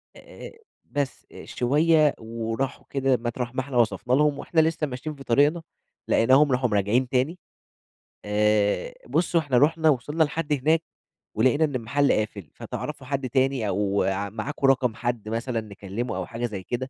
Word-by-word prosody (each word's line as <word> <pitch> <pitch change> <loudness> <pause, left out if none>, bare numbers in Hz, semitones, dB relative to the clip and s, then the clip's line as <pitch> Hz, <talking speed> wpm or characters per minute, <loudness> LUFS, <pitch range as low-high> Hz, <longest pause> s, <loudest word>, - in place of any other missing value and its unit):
آآ، - - -11 0.3
بس، 140 -3 -3
آآ، - - -11
شوية 150 +4 +3
وراحوا 115 +4 -4
كده 135 -2 +1
مطرح 120 +1 -4
ما 130 - +1
إحنا 130 -1 -4
وصفنا 120 +1 +1
لهم 145 +1 +3
وإحنا 160 +2 +2
لسّه 160 -1 0
ماشيين 140 +4 -6
في 140 - -11
طريقنا، 145 +7 +3 0.5
لقيناهم 135 +5 +4
راحوا 125 -1 +1
م - - -3
راجعين 105 +6 +1
تاني. 135 +7 0 0.9
آآ، 105 - +1
بُص 175 +1 0
هو - - +6
إحنا 140 -5 +1
رُحنا 160 +4 +4
ووصلنا 150 +4 +1
لحد 150 0 -2
هناك 155 +4 +2 0.5
ولقينا 130 +8 +3
إن 145 -3 -4
المحل 140 +4 +1
قافل، 105 -6 -2
فتعرفوا 145 -3 -6
حد 135 -2 -2
تاني 130 -2 +1
أو 100 0 0
ع 100 +1 -1
معاكم 120 +7 -2
رقم 125 -4 +2
حد 120 -3 -3
مثلًا 115 +1 -2
نكلّمه 105 +1 -5
أو 95 - -3
حاجة 120 +1 -4
زي 100 -5 -5
كده؟ 130 +4 -4
130 Hz, 165 wpm, -25 LUFS, 115-145 Hz, 0.9 s, هو